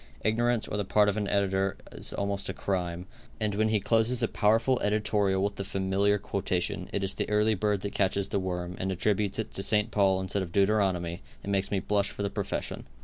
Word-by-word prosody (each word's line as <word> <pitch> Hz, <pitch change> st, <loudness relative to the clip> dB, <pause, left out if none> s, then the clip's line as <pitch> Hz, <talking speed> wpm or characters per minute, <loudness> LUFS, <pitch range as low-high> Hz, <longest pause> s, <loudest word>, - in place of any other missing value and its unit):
Ignorance 120 Hz, +1 st, +2 dB
or 105 Hz, -, -3 dB
the 105 Hz, -, 0 dB
part 105 Hz, +2 st, +3 dB
of 100 Hz, -, -1 dB
an 105 Hz, -1 st, -1 dB
editor 100 Hz, -1 st, +1 dB
is -, -, -5 dB
almost 100 Hz, 0 st, -2 dB
a -, -, -4 dB
crime, 90 Hz, -2 st, -2 dB, 0.3 s
and 105 Hz, -2 st, 0 dB
when 110 Hz, +2 st, +1 dB
he 110 Hz, -1 st, +2 dB
closes 115 Hz, +4 st, +2 dB
a -, -, +3 dB
powerful 115 Hz, +5 st, +2 dB
editorial 105 Hz, -2 st, +1 dB
with 100 Hz, 0 st, -1 dB
the 100 Hz, -, -2 dB
familiar 95 Hz, +1 st, +1 dB
quotation, 90 Hz, -3 st, -2 dB
"It 100 Hz, -, -1 dB
is 95 Hz, -, -1 dB
the -, -, -3 dB
early 105 Hz, +1 st, +3 dB
bird 105 Hz, -1 st, 0 dB
that 100 Hz, -, -4 dB
catches 100 Hz, 0 st, 0 dB
the 100 Hz, -, 0 dB
worm," 90 Hz, -1 st, -3 dB
and 95 Hz, +1 st, -1 dB
attributes 100 Hz, +1 st, 0 dB
it 110 Hz, -, -4 dB
to -, -, -2 dB
St. 105 Hz, +1 st, +2 dB
Paul 95 Hz, -2 st, +3 dB
instead 95 Hz, +1 st, -2 dB
of 90 Hz, -3 st, -5 dB
Deuteronomy, 95 Hz, -4 st, +1 dB, 0.2 s
it 100 Hz, -, -3 dB
makes 100 Hz, 0 st, +1 dB
me 100 Hz, -, 0 dB
blush 100 Hz, +1 st, +1 dB
for 100 Hz, -, -5 dB
the 100 Hz, -, -1 dB
profession. -, -, -3 dB
100 Hz, 215 wpm, -28 LUFS, 95-105 Hz, 0.3 s, part